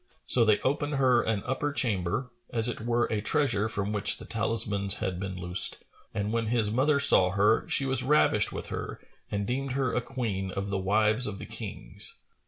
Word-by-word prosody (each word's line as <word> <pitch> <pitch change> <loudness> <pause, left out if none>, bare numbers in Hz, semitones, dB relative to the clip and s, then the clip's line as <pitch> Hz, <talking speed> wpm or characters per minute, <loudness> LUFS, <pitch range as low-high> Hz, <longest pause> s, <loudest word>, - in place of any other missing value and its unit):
So 120 - +7
they 110 -2 +3
opened 145 +2 -1
her 130 -3 +3
an 110 -4 -2
upper 130 +3 -2
chamber, 120 -2 -1 0.2
as 115 -1 +1
it 120 - -4
were 120 +1 +1
a 110 -2 -1
treasure 110 -4 0
from 100 -1 -3
which 100 -1 +3
the - - -11
talismans 105 -3 +1
had 95 -5 -4
been 95 -1 -5
loosed;[FN#443] 90 +1 -2 0.3
and 105 +1 -2
when 115 -1 -1
his 110 -2 0
mother 140 +5 +2
saw 95 -9 +6
her, 105 +4 +2
she 135 - +1
was 130 -1 +1
ravished 125 -6 +2
with - - -7
her - - -6 0.3
and 100 -1 -2
deemed 130 +3 -3
her 130 -2 -1
a 125 - 0
Queen 110 -7 -4
of 100 +1 -4
the 95 - -1
wives 105 +5 +2
of 100 -2 -5
the - - -8
Kings. - - -9
110 Hz, 195 wpm, -28 LUFS, 100-125 Hz, 0.3 s, So